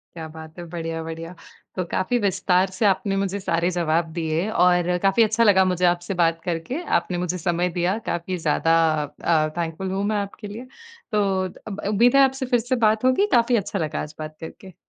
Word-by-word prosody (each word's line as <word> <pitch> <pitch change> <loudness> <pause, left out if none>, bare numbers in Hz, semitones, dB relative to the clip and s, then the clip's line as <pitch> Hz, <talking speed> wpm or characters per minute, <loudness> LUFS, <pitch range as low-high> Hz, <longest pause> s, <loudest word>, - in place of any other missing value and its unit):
क्या 160 -1 -6
बात 160 +1 -11
है, 175 - -6
बढ़िया-बढ़िया। 165 0 -5 0.4
तो 185 - -1
काफ़ी 245 +6 0
विस्तार 190 -2 +1
से 190 +4 -3
आपने 195 0 +1
मुझे 195 0 -1
सारे 170 -1 0
जवाब 165 -2 0
दिए 165 +4 -1
और 180 -4 +3
काफ़ी 195 +4 +4
अच्छा 220 +1 +2
लगा 190 -3 +5
मुझे 180 -1 0
आपसे 175 +2 0
बात 165 -2 +1
करके। 180 - -3 0.2
आपने 180 - -4
मुझे 180 0 -2
समय 175 +1 0
दिया 180 +5 +1
काफ़ी 175 +2 -2
ज़्यादा 165 +1 +2 0.5
अ, 155 -2 +2
थैंकफ़ुल 170 +3 -3
हूँ 195 +1 -1
मैं 210 +1 0
आपके 205 +1 -5
लिए। 230 +5 -8 0.5
तो 210 -1 +2 0.4
अब 205 -1 -5
उम्मीद 235 +5 +4
है 275 - +7
आपसे 265 0 -1
फिर 245 -2 +2
से 245 +3 -1
बात 215 +2 +1
होगी 260 +11 +3
काफ़ी 240 +1 +4
अच्छा 200 -1 -2
लगा 155 -3 -2
आज 150 +1 -9
बात 155 0 -7
करके। 180 +3 -10
180 Hz, 195 wpm, -23 LUFS, 165-205 Hz, 0.5 s, है